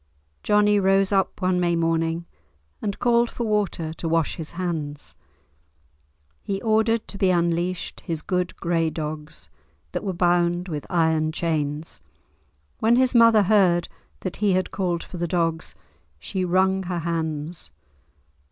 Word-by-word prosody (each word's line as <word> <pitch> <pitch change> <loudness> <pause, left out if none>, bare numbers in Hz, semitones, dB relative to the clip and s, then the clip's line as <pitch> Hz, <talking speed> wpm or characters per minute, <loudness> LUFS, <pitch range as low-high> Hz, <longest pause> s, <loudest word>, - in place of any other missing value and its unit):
Johnie 210 0 +3
rose 195 0 +3
up 195 -1 0
one 185 -1 +2
May 175 -1 +2
morning, 165 0 0 0.6
and 200 -2 -3
called 235 -1 +3
for 240 - -4
water 205 -7 -1
to 165 0 -4
wash 165 -2 +1
his 160 -3 -6
hands. 160 -5 -4 1.3
He 195 -1 -3
ordered 220 0 +2
to 195 - -8
be 190 - +3
unleashed 175 0 0
his 160 -2 -5
good 180 -1 -1
grey 165 -1 0
dogs, 150 - -6 0.4
that - - -3
were 195 - -1
bound 175 0 +1
with 150 -3 -5
iron 160 -2 +2
chains. 155 -2 -2 0.8
When 230 +2 +4
his 255 +1 +3
mother 230 -3 +6
heard 185 -4 +3 0.3
that 185 - -4
he 205 -2 +2
had 185 0 0
called 175 -3 -1
for 180 - -9
the 175 0 -1
dogs, 165 -1 -1 0.4
she 185 - -3
wrung 190 +2 +2
her 180 -1 -3
hands. 160 -1 -3
175 Hz, 145 wpm, -24 LUFS, 165-195 Hz, 1.3 s, mother